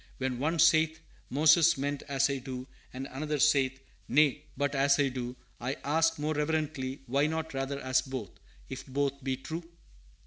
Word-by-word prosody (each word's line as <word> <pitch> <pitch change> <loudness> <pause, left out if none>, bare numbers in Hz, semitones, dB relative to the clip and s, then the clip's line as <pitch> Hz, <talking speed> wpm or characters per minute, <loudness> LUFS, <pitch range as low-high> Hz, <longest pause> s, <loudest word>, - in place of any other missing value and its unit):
"When 130 -2 -2
one 160 +5 0
saith, 160 0 +4 0.3
Moses 155 +3 +5
meant 140 +1 -2
as 140 -1 +2
I 140 -1 -2
do,' 130 0 -6 0.3
and 130 +1 -6
another 150 +3 -2
saith, 135 -2 +3 0.3
'Nay, 150 0 +3
but 145 +1 0
as 140 0 +3
I 140 -1 +3
do,' 125 -1 -5 0.2
I 125 +3 -3
ask, 165 +3 +2
more 150 +1 -1
reverently, 150 -3 -2
'Why 140 +4 +2
not 160 0 -3
rather 135 +1 -2
as 130 -1 +2
both, 130 -8 -6 0.4
if 135 +1 -7
both 140 0 -1
be 130 -1 -1
true?" 160 +5 -6
140 Hz, 170 wpm, -30 LUFS, 130-155 Hz, 0.4 s, Moses